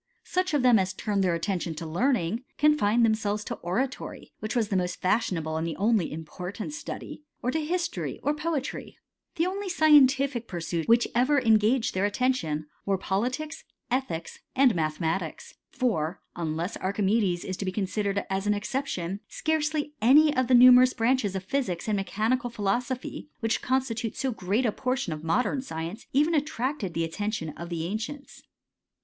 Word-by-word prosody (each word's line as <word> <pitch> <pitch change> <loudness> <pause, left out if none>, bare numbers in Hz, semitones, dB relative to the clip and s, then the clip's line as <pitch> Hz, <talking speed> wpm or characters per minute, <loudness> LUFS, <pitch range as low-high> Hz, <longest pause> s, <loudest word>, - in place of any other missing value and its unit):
Such 370 -3 0
of 280 - +2
tlw 245 -4 +6
as 190 0 -2
turned 200 0 -1
their 175 -2 +2
attention 170 -2 -2
to 165 - -6
learning 195 - 0
confined 240 -7 +4
the 220 -1 +3
selves 210 -1 -2
to - - -4
oratory 250 +10 -3
j - - -18
which 215 +2 -4
was 225 -4 +1
the 195 - -1
most 180 -1 -1
fashionft' 185 -4 0
and 160 +1 -2
the 165 - -3
most 210 -4 +2
important 180 - -6
study, 300 0 -7 0.2
or 250 - +1
to 315 +2 -1
history, 345 +3 -2
or 290 - +2
poet 300 -3 -2 0.7
The 330 - +1
only 390 +2 -3
scientific 280 -6 +4
pursuits 170 -2 -3
which 235 +1 +4
ever 255 +5 +3
engaged 225 +1 +3
d 185 - -2
attention, 205 -7 0 0.2
were 195 -1 +1
politics, 255 - -2 0.3
ethics, 245 -11 -2 0.2
and 260 -3 +5
mathematics, 160 +1 -2 0.3
r 185 - 0 0.2
unless 165 +2 -3
Archimedes 195 -1 0
is 185 - -3
to 200 - -4
be 185 - -1
considered 200 +1 -1
as 195 +1 -2
an 210 - +3
except! 260 +6 -2 0.3
Scarcely 305 -1 -1
any 295 +6 +6
of 255 -1 +2
the 255 - +5
numerous 250 +1 +8
branches 230 -4 +1
of 190 - -3
physics 210 -6 -2
i 215 - +1
mechanical 220 +5 0
philosophy, 240 +6 -2
which 225 0 0
constitute 245 -3 -1
so 265 -2 -1
gMd 210 +4 0
portion 255 -9 -1
of 155 0 -8
modern 250 - +1
science, 165 -1 -6
even 300 +5 +3
attracted 280 - -1
the 165 - +1
ait 165 0 -4 0.2
tion 160 -7 -3
of 170 +2 -8
the 165 -2 -3
ancients. 225 +9 -5
220 Hz, 165 wpm, -27 LUFS, 185-260 Hz, 0.7 s, numerous